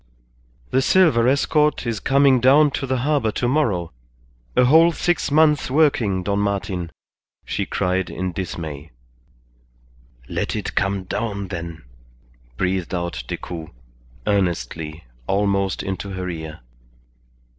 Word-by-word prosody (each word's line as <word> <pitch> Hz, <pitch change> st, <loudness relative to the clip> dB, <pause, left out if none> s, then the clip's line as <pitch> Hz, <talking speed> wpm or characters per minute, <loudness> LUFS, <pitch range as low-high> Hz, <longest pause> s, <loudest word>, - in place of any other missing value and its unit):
"The 130 Hz, -, +3 dB
silver 140 Hz, -7 st, +4 dB
escort 150 Hz, +2 st, +2 dB
is 115 Hz, -3 st, -2 dB
coming 135 Hz, +2 st, +4 dB
down 140 Hz, +4 st, +5 dB
to 135 Hz, -, -3 dB
the 130 Hz, -1 st, 0 dB
harbour 145 Hz, -8 st, +1 dB
tomorrow; 115 Hz, -, 0 dB, 0.6 s
a 125 Hz, -, +5 dB
whole 160 Hz, +6 st, +6 dB
six 175 Hz, +1 st, 0 dB
months' 150 Hz, -1 st, +3 dB
working, 125 Hz, -10 st, +2 dB
Don 100 Hz, +1 st, 0 dB
Martin!" 100 Hz, -4 st, -2 dB, 0.5 s
she -, -, -2 dB
cried 90 Hz, 0 st, -1 dB
in 95 Hz, 0 st, -3 dB
dismay. 80 Hz, -4 st, -6 dB, 1.4 s
"Let -, -, -2 dB
it -, -, -4 dB
come 100 Hz, -1 st, 0 dB
down, 100 Hz, 0 st, -3 dB
then," 85 Hz, -3 st, -6 dB, 0.7 s
breathed 90 Hz, 0 st, -1 dB
out 85 Hz, -8 st, -3 dB
Decoud, 80 Hz, +2 st, -6 dB, 0.6 s
earnestly, 80 Hz, -5 st, -1 dB, 0.2 s
almost 100 Hz, -1 st, 0 dB
into 95 Hz, +1 st, -4 dB
her 95 Hz, 0 st, -4 dB
ear. 80 Hz, -4 st, -6 dB
100 Hz, 115 wpm, -22 LUFS, 90-135 Hz, 1.4 s, whole